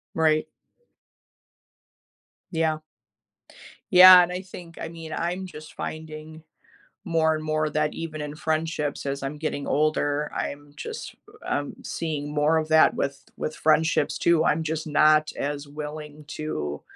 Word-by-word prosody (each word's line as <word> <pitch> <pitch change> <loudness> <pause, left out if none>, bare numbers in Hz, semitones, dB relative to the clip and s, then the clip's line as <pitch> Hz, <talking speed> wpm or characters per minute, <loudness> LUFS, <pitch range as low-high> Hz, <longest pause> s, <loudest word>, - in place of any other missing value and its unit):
Right. 155 -1 +2 2.0
Yeah. 160 -2 +1 1.1
Yeah, 180 0 +11
and 175 0 0
I 180 +1 -3
think, 175 -3 -12
I - - -3
mean, 165 -1 -8
I'm 180 +3 -2
just 155 -3 -11
finding 155 0 -7 0.6
more 160 -2 +2
and 155 0 -4
more 155 0 0
that 150 0 0
even 155 -2 -6
in 150 0 -5
friendships 155 -2 -2
as 140 0 -3
I'm 135 +2 -4
getting 145 -2 -3
older, 150 -1 +1
I'm 145 0 -5
just, - - -7 0.3
um, 145 0 -2
seeing 150 -3 -4
more 150 +2 +3
of 155 0 0
that 160 0 +5
with 140 0 -3
with 155 - -4
friendships, 160 +1 +2
too. 170 -1 +3
I'm 160 -1 +2
just 160 0 -3
not 155 0 +4
as 145 0 -3
willing 150 0 -8
to 75 - -4
155 Hz, 140 wpm, -25 LUFS, 150-160 Hz, 2.0 s, Yeah